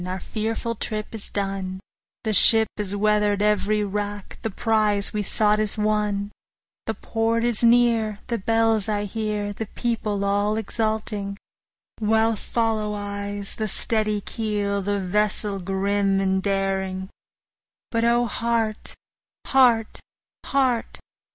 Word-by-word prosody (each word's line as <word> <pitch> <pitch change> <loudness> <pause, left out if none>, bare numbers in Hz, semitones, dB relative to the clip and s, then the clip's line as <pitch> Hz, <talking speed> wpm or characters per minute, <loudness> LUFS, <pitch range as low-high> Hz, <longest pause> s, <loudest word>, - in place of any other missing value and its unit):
our 185 +1 -3
fearful 225 +3 -3
trip 215 -1 -5
is 220 -2 -8
done, 195 -2 -3 0.4
The 220 - 0
ship 220 +3 +6
has 205 -1 -2
weather'd 210 0 +2
every 210 0 +2
rack, 205 0 -4
the 225 - -2
prize 210 -1 +1
we 210 - 0
sought 210 +1 +2
is 215 -1 -1
won, 210 -1 0 0.6
The - - -1
port 230 0 0
is 240 -2 0
near, 230 -3 +4
the 235 -1 -2
bells 225 0 +2
I 205 -1 0
hear, 210 0 -2
the 220 +1 -5
people 210 -3 -2
all 205 +2 +1
exulting, 215 -2 -2 0.6
While 220 +1 +3
follow 215 -1 -1
eyes 200 0 -4
the 215 - -2
steady 215 0 0
keel, 205 -2 -2
the 200 +1 -1
vessel 205 +1 0
grim 195 +1 +1
and 190 0 +1
daring; 190 -1 -1 0.8
But 230 -1 +1
O 235 +1 +3
heart! 230 -1 -1 0.5
heart! 240 -4 +3 0.5
heart! 260 -4 +1
210 Hz, 125 wpm, -24 LUFS, 200-225 Hz, 0.8 s, ship